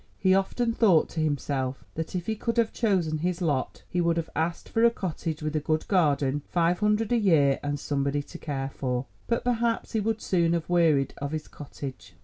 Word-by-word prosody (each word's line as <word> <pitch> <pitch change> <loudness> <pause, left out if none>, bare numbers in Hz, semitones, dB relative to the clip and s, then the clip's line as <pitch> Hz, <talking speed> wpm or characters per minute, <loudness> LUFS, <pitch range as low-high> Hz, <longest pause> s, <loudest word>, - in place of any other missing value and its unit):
He 185 0 +3
often 230 +5 +1
thought 195 -9 +4
to 165 - -5
himself 140 -3 -1
that 160 +3 -4
if 175 -1 -2
he 220 - -1
could 230 +2 -2
have 230 -2 +2
chosen 180 -9 +1
his 175 +2 -1
lot, 150 -7 -1
he 175 - -1
would 170 0 +2
have 165 - -3
asked 165 +1 -1
for 225 - +1
a 235 - +8
cottage 165 -7 -4
with 155 0 -2
a - - +3
good 155 +1 -1
garden, 145 -6 +2
five 175 0 +2
hundred 210 +2 +1
a 240 - +4
year, 150 -9 +4
and 145 0 -2
somebody 140 0 -1
to - - -11
care 135 -2 -3
for. 125 -1 -2 0.2
But 235 - 0
perhaps 235 -1 0
he 220 - 0
would 220 +1 -1
soon 170 -2 +2
have 170 -1 -1
wearied 165 -6 +3
of 140 +2 -3
his 155 -1 -4
cottage. 140 -2 -9
165 Hz, 210 wpm, -27 LUFS, 145-200 Hz, 0.2 s, a